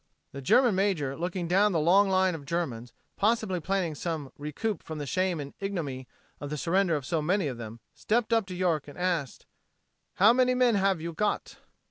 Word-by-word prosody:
The 140 - -7
German 240 - +4
major 185 -9 0
looking 175 +2 -3
down 195 +3 +3
the 165 - +2
long 190 +6 +4
line 190 -1 +3
of 160 -3 -7
Germans, 125 -8 -3 0.3
possibly 215 -3 +1
planning 180 -1 -1
some 150 -3 -4
recoup 150 +9 -3
from 160 - -7
the 145 - -4
shame 185 +3 0
and 140 -1 -7
ignominy 155 -10 -4 0.3
of 145 - -6
the 150 - -3
surrender 175 +2 +1
of 145 -3 -4
so 165 +2 -1
many 180 +4 +1
of 130 -4 -4
them, 115 0 -8
stepped 230 +1 0
up 225 -4 +2
to 185 - -6
York 170 -5 0
and 145 - -11
asked: 175 -7 -2 0.7
"How 210 +5 +6
many 255 0 +3
men 250 -2 +3
have 195 -4 +1
you 170 +1 -5
got?" 210 +5 -2
175 Hz, 195 wpm, -28 LUFS, 150-195 Hz, 0.7 s, How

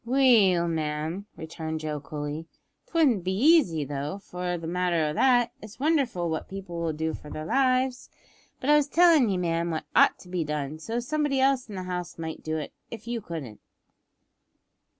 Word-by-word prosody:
"Well, 230 -9 +4
ma'am," 160 +4 -3
returned 160 0 -5
Joe 155 -1 -3
coolly, 150 +2 -5 0.4
"it - - -29
wouldn't 265 - +3
be 185 +1 -1
easy 225 - +4
though, 145 +4 -4
for 180 -2 -4
the 165 - -8
matter 175 -1 +1
o' 150 - -1
that, 245 +4 +3
it's 215 +2 -12
wonderful 275 - +1
what 160 -1 -3
people 185 -3 -6
will 165 -1 0
do 160 +1 -2
for 150 - -9
their 155 +1 -6
lives; 255 +3 +1 0.5
but 280 - +1
I 300 - +7
was 295 -1 +2
tellin' 325 -6 +5
ye, 190 - 0
ma'am, 170 -1 0
what 160 -1 -3
ought - - +5
to - - -15
be 180 -2 -2
done, 150 0 -4
so 225 +8 -5
as 240 0 -2
somebody 295 -2 0
else 265 -2 +2
in 205 - -7
the 185 - -4
house 180 -1 -5
might 160 -1 -5
do 155 0 -2
it, 155 - -6 0.2
if 225 0 -9
you 235 -1 -2
couldn't. 155 - -7
180 Hz, 190 wpm, -27 LUFS, 160-245 Hz, 0.5 s, I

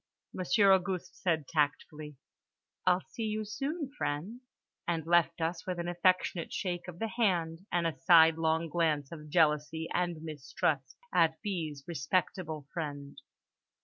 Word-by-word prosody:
Monsieur 195 +2 +4
Auguste 185 -1 -1
said 160 -6 0
tactfully, 150 0 -1 0.7
"I'll 180 +1 +4
see 225 - -5
you 215 0 -2
soon, 275 - -3
friends," 190 - -3 0.5
and 165 -2 -1
left 170 0 +3
us 165 +1 -2
with 180 -1 -2
an 170 0 -3
affectionate 175 -1 +1
shake 180 -2 -3
of 175 -2 -8
the 225 - -2
hand 185 -6 0
and 175 -1 +1
a 155 -5 -2
sidelong 160 +1 +5
glance 155 -4 0
of 150 -2 -9
jealousy 160 0 +2
and 175 -3 -1
mistrust 150 -2 -2 0.2
at 165 -2 +3
B.'s 160 -8 -3
respectable 160 -1 -1
friend. 145 -4 -5
165 Hz, 135 wpm, -31 LUFS, 155-180 Hz, 0.7 s, sidelong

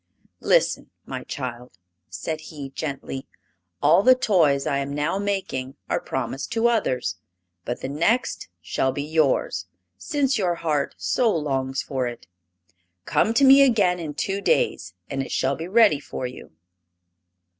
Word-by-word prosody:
"Listen, - - +2 0.2
my - - -6
child," 125 -5 -6 0.3
said 155 - -4
he, 145 -4 -8
gently; 135 -2 -5 0.6
"all 155 +6 +6
the 255 +4 +6
toys 165 - +2
I 140 -3 0
am 140 +1 -3
now 150 +6 0
making 190 -10 -3 0.2
are - - +2
promised 135 +1 -4
to 230 +1 +3
others. 130 - 0 0.5
But 120 - -4
the - - -3
next 170 - 0 0.2
shall 130 +9 0
be 140 +2 -3
yours, 145 - +1 0.3
since 275 - 0
your 180 -3 +1
heart 150 -4 -1
so 245 -3 +1
longs 135 -6 -1
for 130 -3 -2
it. 120 -1 -8 0.8
Come 220 - +2
to 280 - +4
me 275 +1 +8
again 205 -9 +4
in 155 -3 -5
two 195 +6 -2
days 90 - 0
and 135 -1 -3
it 135 - -6
shall 135 +1 +1
be 165 +4 -6
ready 205 -6 +5
for 130 - -6
you." 125 -8 -8
150 Hz, 150 wpm, -24 LUFS, 135-200 Hz, 0.8 s, me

